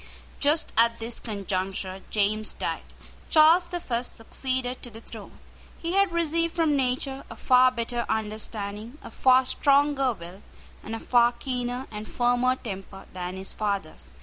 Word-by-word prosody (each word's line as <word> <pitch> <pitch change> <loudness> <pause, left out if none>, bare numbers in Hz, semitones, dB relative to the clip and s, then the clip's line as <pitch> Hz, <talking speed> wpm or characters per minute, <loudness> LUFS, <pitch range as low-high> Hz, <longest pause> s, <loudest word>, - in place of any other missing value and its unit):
Just 300 +3 +2
at 230 0 +5
this 230 +1 -4
conjuncture 190 -2 -3
James 215 +1 +1
died. - - -3 0.5
Charles 325 +3 +6
the 350 0 -4
First 245 -6 -3
succeeded 255 +2 -3
to 245 - -8
the 225 -1 -11
throne. - - -11 0.4
He 335 +1 -3
had 395 -1 +3
received 335 0 0
from 320 -3 +2
nature 265 +1 -1
a - - -8
far 255 0 +5
better 235 -1 -3
understanding, 215 +2 -4
a - - -9
far 260 0 +4
stronger 280 0 +3
will, 180 0 -11 0.4
and 225 - -5
a - - -5
far 240 0 +4
keener 250 0 -3
and 210 0 -6
firmer 245 +1 +2
temper 195 -4 -8
than 180 0 -5
his 190 0 -3
father's. 200 -6 -3
240 Hz, 150 wpm, -26 LUFS, 210-270 Hz, 0.5 s, Charles